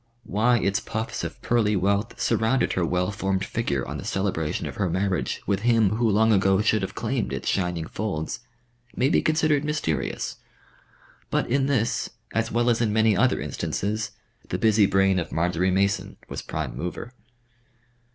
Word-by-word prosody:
Why 115 +5 +2
its 100 -2 +1
puffs 110 +1 -4
of - - -5
pearly 110 -3 +2
wealth 100 +4 0
surrounded 115 +3 +1
her 90 - 0
well 90 +3 0
formed 95 -1 -1
figure 70 - -2
on - - -5
the - - -7
celebration 95 -6 -1
of - - -6
her 100 -3 0
marriage 95 +2 -1
with 100 -1 +1
him 115 -3 +3
who 115 -1 +2
long 110 +2 +4
ago 95 -1 +3
should 110 -1 +2
have 95 - -4
claimed 65 - -2
its 65 - -4
shining 90 -4 0
folds, 85 -5 -3 0.6
may 130 - +2
be - - +3
considered 155 -2 +2
mysterious. 80 - -2 0.9
But - - 0
in 135 +1 +2
this, 115 -5 0 0.2
as 115 0 0
well 120 +1 +2
as 115 - 0
in 110 -3 +2
many 110 0 +3
other 130 +4 +3
instances, 110 +2 -2 0.4
the - - -1
busy 110 -2 +4
brain 95 -1 +3
of 85 - -4
Marjory 90 +2 +1
Mason 100 +1 0
was - - -5
prime - - -4
mover. 115 +7 -5
105 Hz, 170 wpm, -25 LUFS, 95-115 Hz, 0.9 s, long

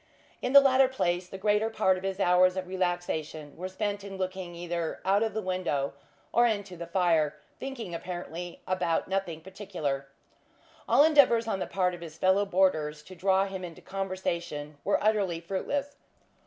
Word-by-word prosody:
In 255 - -1
the 280 - +11
latter 270 -1 +5
place, 180 -8 -1
the 195 - -7
greater 210 +2 +2
part 190 -4 +2
of 185 - -6
his 195 0 -3
hours 180 0 +4
of 185 - -2
relaxation 175 -5 -3
were 185 +2 -5
spent 205 +1 -3
in 195 -1 -7
looking 185 -2 -4
either 170 -1 -3
out 195 +2 +3
of 225 -1 -1
the 220 - -1
window 180 -7 -1 0.4
or 240 0 +5
into 205 -4 -2
the 170 0 -7
fire; 165 -4 +2 0.2
thinking, 250 -9 -6
apparently, 175 0 -6
about 180 -3 0
nothing 190 -4 -2
particular. 155 -7 -4 0.8
All 285 - +7
endeavours 270 -7 +5
on 195 -3 -1
the - - -2
part 180 -2 +1
of 175 - -8
his 160 -2 -9
fellow 190 +3 +3
boarders 155 -6 +1
to 185 - -12
draw 190 +1 +2
him 190 -1 -6
into 170 -3 -8
conversation 170 -6 -4
were 200 - +1
utterly 205 -6 +2
fruitless. 275 +11 -3
185 Hz, 170 wpm, -29 LUFS, 170-200 Hz, 0.8 s, the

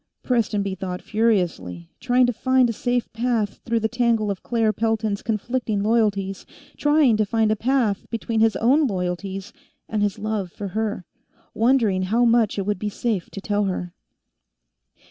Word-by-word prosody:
Prestonby 210 -5 0
thought 185 -1 -5
furiously, 175 - -1
trying 250 -1 +3
to 245 - 0
find 260 +2 +3
a 230 - -2
safe 245 +2 -2
path 225 -3 -1
through 230 -1 0
the 220 - +2
tangle 230 -3 +1
of 195 - -5
Claire 225 -2 +1
Pelton's 220 -2 -1
conflicting 225 -1 -2
loyalties, 205 -4 +1 0.3
trying 295 -5 +3
to 215 - +3
find 220 +1 +1
a - - +2
path 230 -3 0
between 230 -1 -2
his 220 -2 +3
own 270 +9 +3
loyalties 190 +1 -4 0.3
and 215 -1 -2
his 205 -2 0
love 210 -4 -3
for 200 +1 -6
her, 210 -2 -3 0.5
wondering 225 -5 +2
how 225 +6 +2
much 230 -3 +3
it 195 - -1
would 205 -2 -1
be 210 - -2
safe 210 -3 -2
to - - -7
tell 205 0 0
her. 180 -2 -3
215 Hz, 165 wpm, -23 LUFS, 200-235 Hz, 0.5 s, trying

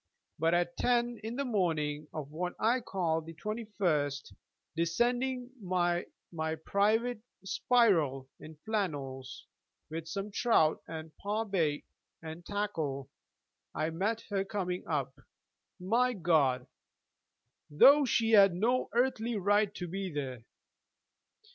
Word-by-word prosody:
But 165 +2 +3
at 175 0 0
ten 240 -1 +1
in 225 +2 -4
the 280 +1 -1
morning 155 - -1
of 150 -2 -6
what 180 +3 -3
I 235 +4 +2
called 165 -8 -1
the 165 - -9
21st, 185 -9 -2 0.4
descending 245 +9 0
by 175 -2 0 0.2
my 160 -1 -2
private 215 +7 +1 0.2
spiral 170 - +2
in 155 0 -11
flannels 145 -12 -3 0.5
with 165 0 -5
some 200 +3 -4
trout 200 -8 +3
and 160 -1 -8
par 210 +3 -2
bait, 165 -8 0 0.3
and 160 +1 -8
tackle 160 -10 -3 0.6
I 155 +1 -1
met 205 +7 -1
her 195 -1 +1
coming 190 -3 -3
up, 140 -4 -2 0.6
my 235 +7 +2
God, 150 - +2 1.0
though 280 - +7
she 230 -3 +2
had 200 -4 +7
no 240 +7 +1
earthly 240 -2 +1
right 205 +1 +2
to 180 - -5
be 190 +1 -4
there. 130 -5 -5
180 Hz, 120 wpm, -31 LUFS, 160-220 Hz, 1.0 s, though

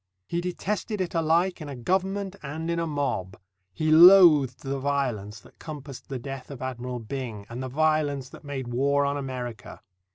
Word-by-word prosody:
He 170 0 -2
detested 205 +4 -3
it 185 -2 -2
alike 170 +2 +1
in 150 - -6
a 140 - -6
government 190 +8 -1
and 160 +4 -4
in 170 - -1
a 165 - -1
mob. 140 - -2 0.3
He 155 - -1
loathed 160 -6 +7
the 135 0 -3
violence 125 -7 -2
that - - -20
compassed 145 -4 -9
the 135 - -3
death 135 +1 -7
of 140 -3 -8
Admiral 125 -1 -4
Byng 115 -3 -6
and 120 +2 -6
the 130 - -4
violence 145 -2 +1
that - - -13
made 140 -3 -5
war 140 +3 +2
on 140 0 0
America. 125 -5 -6
140 Hz, 175 wpm, -26 LUFS, 130-165 Hz, 0.3 s, loathed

